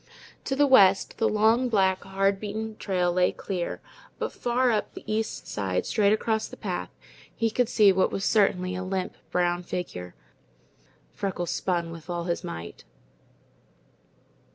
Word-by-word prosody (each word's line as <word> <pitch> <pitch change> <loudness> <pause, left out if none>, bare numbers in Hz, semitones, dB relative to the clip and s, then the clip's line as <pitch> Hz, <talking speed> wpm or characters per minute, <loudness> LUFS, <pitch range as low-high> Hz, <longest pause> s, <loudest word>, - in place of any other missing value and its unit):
To 270 - -1
the 290 +1 +4
west, 200 -8 +5
the 225 - +3
long, 225 +4 +3
black, 190 -4 +2
hard 195 0 0
beaten 215 +1 -4
trail 180 -3 0
lay 180 0 +3
clear; 180 -3 -4 0.4
but - - -3
far 245 +1 +1
up 215 - -1
the - - -8
east 215 +1 -3
side, 95 -3 -2
straight 205 -2 +2
across 220 0 0
the - - -11
path, - - -4 0.5
he 225 -1 0
could 245 +1 +1
see 210 -4 +6
what 190 0 +2
was 195 - -2
certainly 185 -4 +2
a 185 - -3
limp, 185 0 -3
brown 175 0 +1
figure. 90 - -6 1.0
Freckles 185 -4 -3
spun 170 -3 -1
with 165 0 -11
all 175 -1 -2
his 170 0 -2
might. 85 0 -7
195 Hz, 155 wpm, -26 LUFS, 175-220 Hz, 1.0 s, see